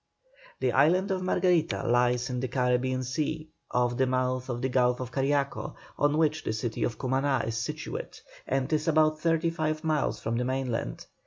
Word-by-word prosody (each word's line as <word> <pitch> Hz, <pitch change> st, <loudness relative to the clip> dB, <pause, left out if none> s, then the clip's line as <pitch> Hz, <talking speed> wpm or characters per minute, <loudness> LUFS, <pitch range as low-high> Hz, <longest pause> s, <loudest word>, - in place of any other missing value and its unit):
The -, -, +2 dB
island 185 Hz, +5 st, +3 dB
of 190 Hz, -1 st, 0 dB
Margarita 180 Hz, -3 st, +1 dB
lies 125 Hz, +1 st, +2 dB
in 125 Hz, -, -2 dB
the 130 Hz, -, -1 dB
Carribean 130 Hz, +1 st, 0 dB
Sea, 155 Hz, +4 st, -3 dB, 0.2 s
off 120 Hz, 0 st, +1 dB
the 130 Hz, 0 st, +2 dB
mouth 130 Hz, 0 st, -1 dB
of 120 Hz, 0 st, -3 dB
the -, -, +2 dB
Gulf 125 Hz, -1 st, +2 dB
of 125 Hz, -1 st, -5 dB
Cariaco, 140 Hz, +1 st, -1 dB, 0.2 s
on 145 Hz, +1 st, +2 dB
which 155 Hz, 0 st, +1 dB
the -, -, -1 dB
city 110 Hz, +1 st, -3 dB
of 115 Hz, -, -1 dB
Cumaná 135 Hz, +1 st, 0 dB
is 115 Hz, -, -2 dB
situate, 115 Hz, -, -5 dB, 0.3 s
and 135 Hz, +3 st, 0 dB
is 155 Hz, +2 st, 0 dB
about 155 Hz, -1 st, +3 dB
thirty 165 Hz, 0 st, +2 dB
five 155 Hz, -1 st, -2 dB
miles 155 Hz, -3 st, 0 dB
from 115 Hz, +1 st, -2 dB
the 125 Hz, -, 0 dB
mainland. 125 Hz, -, -2 dB
130 Hz, 180 wpm, -28 LUFS, 125-155 Hz, 0.3 s, island